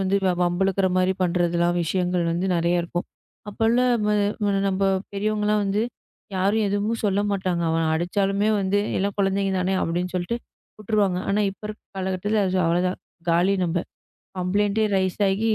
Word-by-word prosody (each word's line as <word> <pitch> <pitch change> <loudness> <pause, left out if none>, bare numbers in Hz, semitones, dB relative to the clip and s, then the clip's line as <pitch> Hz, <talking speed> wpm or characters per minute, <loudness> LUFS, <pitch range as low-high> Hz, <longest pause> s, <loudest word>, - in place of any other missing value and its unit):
வந்து, 195 +1 +1
வ - - +4
வம்பிழுக்குற 190 +2 +1
மாரி 185 +1 +3
பண்றதெல்லாம் 175 0 +1
விஷயங்கள் 180 +1 0
வந்து 175 +3 -1
நிறைய 170 +1 +2
இருக்கும். 175 +1 -3 0.4
அப்பல்லாம் 230 +2 +2 0.6
நம்ம 195 +1 -1 0.3
பெரியவங்க 210 +1 -1
எல்லாம் 210 0 +2
வந்து 200 +2 0 0.5
யாரும் 200 +4 +2
எதுவும் 205 +3 -1
சொல்லமாட்டாங்க. 195 -3 0
அவன் 165 0 +1
அடிச்சாலுமே 195 +5 0
வந்து 195 +1 +1 0.2
எல்லாம் 200 +1 -1
குழந்தைங்கதானே 195 -1 +1
அப்படின்னு 175 +2 -2
சொல்லிட்டு 185 +7 -1 0.4
விட்டுருவாங்க. 205 -4 +1
ஆனா 205 +2 +2
இப்ப 195 - -16
இருக்குற 215 - -10
கால 185 - -2
கட்டத்துல 205 +3 0 0.2
அவ்வளதான் 180 +2 +1 0.3
காலி 180 +4 +3
நம்ப 175 0 0 0.6
கம்ப்ளைண்டே 205 +4 +1
ரைஸ்ஸாகி 195 +3 +1
195 Hz, 135 wpm, -24 LUFS, 180-205 Hz, 0.6 s, வ